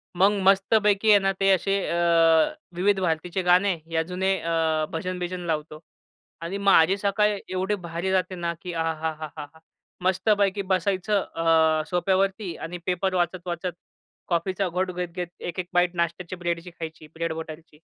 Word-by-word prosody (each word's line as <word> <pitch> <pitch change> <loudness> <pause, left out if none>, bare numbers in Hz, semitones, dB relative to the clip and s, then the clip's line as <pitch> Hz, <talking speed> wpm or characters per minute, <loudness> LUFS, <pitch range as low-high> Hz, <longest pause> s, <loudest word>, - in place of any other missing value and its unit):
मग 195 +3 +5 0.2
मस्तपैकी 205 +1 +3
आहे 205 - +7
ना, 195 0 +1
ते 195 0 +3
असे 195 +1 +2
अ, - - -1 0.8
विविध 195 +2 +2
भारतीचे 175 +1 -1
गाणे 180 +1 +3
या 160 0 +1
जुने 190 +1 +1
अ, 160 -2 0
भजन-बिजन 180 +1 -4
लावतो 155 0 -4 0.6
आणि 170 +4 -4
माझी 195 -2 +4
सकाळ 205 +1 +1
एवढे 185 +3 -1
भारी 170 +3 -2
जाते 185 0 0
ना, 170 -1 -2
की 180 -1 -6
आहाहाहाहा! 160 -2 -3 0.6
मस्तपैकी 200 +1 +2
बसायचं 195 +2 +1
अ, 160 -1 +3
सोफ्यावरती 190 +1 0
आणि 175 +2 -6
पेपर 185 +1 0
वाचत-वाचत, 175 0 -2 0.6
कॉफीचा 185 +3 0
घोट 185 +2 -1
घेत-घेत, 180 0 -4
एक-एक 175 +1 -4
बाईट 175 0 +2
नाश्त्याची 170 +1 -2
ब्रेडची 175 0 -3
खायची. 160 -2 -8
ब्रेड 165 0 -2
बटरची. 160 -1 -9
180 Hz, 135 wpm, -25 LUFS, 165-190 Hz, 0.8 s, आहे